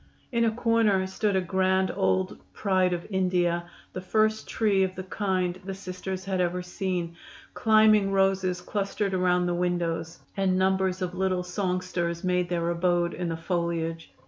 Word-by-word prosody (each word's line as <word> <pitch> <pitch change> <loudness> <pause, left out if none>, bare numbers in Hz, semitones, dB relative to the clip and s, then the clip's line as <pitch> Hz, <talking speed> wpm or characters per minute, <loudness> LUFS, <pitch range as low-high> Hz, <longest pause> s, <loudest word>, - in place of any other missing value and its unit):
In 235 -2 +2
a - - +4
corner 225 -4 +2
stood 200 +2 -1
a 190 - +3
grand 190 +1 +1
old 190 -1 0
"Pride 185 -2 +1
of 175 -1 -3
India," 180 -2 +1 0.3
the 185 - -4
first 215 +3 +1
tree 205 -3 +2
of 185 -1 0
the 185 - -5
kind 185 -2 -1
the 195 0 -5
Sisters 185 0 -6
had 190 -2 0
ever 180 0 -1
seen; 180 -2 -3 0.4
climbing 215 -2 +4
roses 195 -2 +1
clustered 200 0 -2
around 180 -1 +2
the 175 - 0
windows, 175 -2 -1 0.2
and 190 -2 +1
numbers 190 0 +1
of 180 -1 -3
little 185 -1 0
songsters 180 -2 -2
made 180 -1 +1
their 170 -1 -1
abode 175 0 +1
in 180 -1 -3
the 165 - -3
foliage. 165 -1 -2
185 Hz, 160 wpm, -27 LUFS, 180-195 Hz, 0.4 s, a